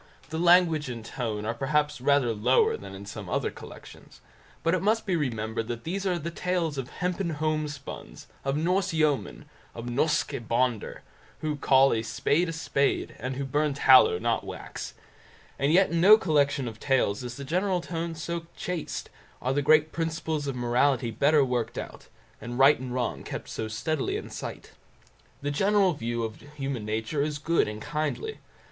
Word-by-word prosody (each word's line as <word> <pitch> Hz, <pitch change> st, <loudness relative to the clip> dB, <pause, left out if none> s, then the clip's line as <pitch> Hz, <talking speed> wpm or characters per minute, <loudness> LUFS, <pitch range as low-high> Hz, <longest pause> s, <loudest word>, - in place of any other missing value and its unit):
The 160 Hz, -, -2 dB
language 170 Hz, -4 st, +4 dB
and 115 Hz, -2 st, -6 dB
tone 110 Hz, -5 st, -3 dB
are 115 Hz, -, -1 dB
perhaps 150 Hz, +3 st, 0 dB
rather 135 Hz, -3 st, +3 dB
lower 115 Hz, +5 st, +3 dB
than 100 Hz, -1 st, -9 dB
in 100 Hz, +1 st, -9 dB
some 100 Hz, -2 st, -7 dB
other -, -, 0 dB
collections, -, -, -13 dB, 0.4 s
but 165 Hz, -, +2 dB
it 185 Hz, -, +1 dB
must 215 Hz, +3 st, +1 dB
be 190 Hz, -4 st, +1 dB
remembered 115 Hz, -6 st, -2 dB
that 120 Hz, -1 st, -5 dB
these 195 Hz, +4 st, -2 dB
are 180 Hz, -2 st, +1 dB
the 170 Hz, +1 st, -4 dB
tales 170 Hz, -4 st, -1 dB
of 130 Hz, -1 st, -5 dB
"hempen 180 Hz, -2 st, -2 dB
homespuns", 155 Hz, -2 st, -4 dB, 0.2 s
of 135 Hz, +1 st, 0 dB
Norse 185 Hz, +3 st, +1 dB
yeomen, 150 Hz, -, 0 dB, 0.3 s
of 115 Hz, -, -6 dB
Norske 140 Hz, +6 st, 0 dB
Bonder, 120 Hz, -2 st, 0 dB, 0.4 s
who 155 Hz, -1 st, -1 dB
call 135 Hz, -1 st, +4 dB
a 110 Hz, -, 0 dB
spade 150 Hz, +9 st, +1 dB
a -, -, -2 dB
spade, 140 Hz, -3 st, 0 dB
and 130 Hz, +3 st, -3 dB
who 140 Hz, +1 st, -3 dB
burn 145 Hz, +1 st, 0 dB
tallow, 130 Hz, -9 st, +7 dB
not -, -, 0 dB
wax; -, -, -7 dB, 0.6 s
and 140 Hz, +2 st, +2 dB
yet 185 Hz, +2 st, +4 dB
in 170 Hz, 0 st, +1 dB
no 210 Hz, +4 st, +9 dB
collection 145 Hz, -, +1 dB
of 110 Hz, -1 st, -7 dB
tales 125 Hz, -5 st, +1 dB
is 125 Hz, 0 st, -6 dB
the 140 Hz, -, -6 dB
general 180 Hz, +5 st, +1 dB
tone 170 Hz, -1 st, -4 dB
so 165 Hz, +1 st, -4 dB
chaste, 180 Hz, -3 st, -4 dB, 0.3 s
are 130 Hz, -, -1 dB
the 145 Hz, -, +1 dB
great 155 Hz, +2 st, +4 dB
principles 160 Hz, -2 st, -2 dB
of 135 Hz, -, -2 dB
morality 120 Hz, 0 st, +1 dB
better 145 Hz, +4 st, +4 dB
worked 125 Hz, -3 st, -2 dB
out, -, -, -7 dB, 0.3 s
and 120 Hz, +1 st, -5 dB
right 135 Hz, +3 st, +6 dB
and 125 Hz, -1 st, -5 dB
wrong 125 Hz, -2 st, -2 dB
kept -, -, -6 dB
so 110 Hz, -, -4 dB
steadily 135 Hz, +7 st, -2 dB
in -, -, -8 dB
sight. -, -, -7 dB, 0.7 s
The 145 Hz, -, -1 dB
general 195 Hz, +3 st, +3 dB
view 120 Hz, -4 st, -3 dB
of 110 Hz, -1 st, -4 dB, 0.2 s
human 135 Hz, -6 st, -3 dB
nature 110 Hz, +7 st, -1 dB
is 150 Hz, 0 st, -1 dB
good 165 Hz, +3 st, +1 dB
and 105 Hz, 0 st, -5 dB
kindly. 155 Hz, -, -3 dB
145 Hz, 180 wpm, -27 LUFS, 120-165 Hz, 0.7 s, no